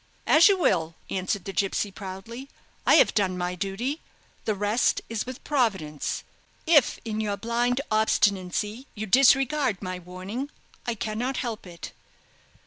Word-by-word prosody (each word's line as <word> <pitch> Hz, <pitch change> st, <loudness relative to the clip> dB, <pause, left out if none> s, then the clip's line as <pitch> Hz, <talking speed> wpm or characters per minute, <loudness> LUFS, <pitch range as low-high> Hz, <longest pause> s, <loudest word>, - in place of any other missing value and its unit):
"As 310 Hz, +2 st, +7 dB
you 395 Hz, -, +4 dB
will," 165 Hz, -, +1 dB, 0.2 s
answered 190 Hz, +1 st, -2 dB
the 195 Hz, -, -5 dB
gipsy, 200 Hz, +1 st, 0 dB
proudly. 215 Hz, +7 st, -8 dB, 0.4 s
"I -, -, +7 dB
have -, -, +5 dB
done 190 Hz, -3 st, +1 dB
my 180 Hz, 0 st, -2 dB
duty. 200 Hz, -, -3 dB, 0.4 s
The 215 Hz, -, 0 dB
rest 205 Hz, +4 st, +1 dB
is 225 Hz, +1 st, -3 dB
with 255 Hz, -1 st, -8 dB
Providence. 190 Hz, -, -1 dB, 0.4 s
If 315 Hz, -4 st, +4 dB
in 220 Hz, -1 st, -2 dB
your 205 Hz, -2 st, -2 dB
blind 240 Hz, +4 st, 0 dB
obstinacy 210 Hz, +2 st, +1 dB
you 215 Hz, 0 st, -4 dB
disregard 270 Hz, 0 st, +4 dB
my 185 Hz, -2 st, -5 dB
warning, 185 Hz, +10 st, -6 dB, 0.4 s
I 235 Hz, -, 0 dB
cannot 225 Hz, +5 st, -2 dB
help 225 Hz, -6 st, -4 dB
it. 170 Hz, -2 st, -9 dB
215 Hz, 140 wpm, -26 LUFS, 190-245 Hz, 0.4 s, As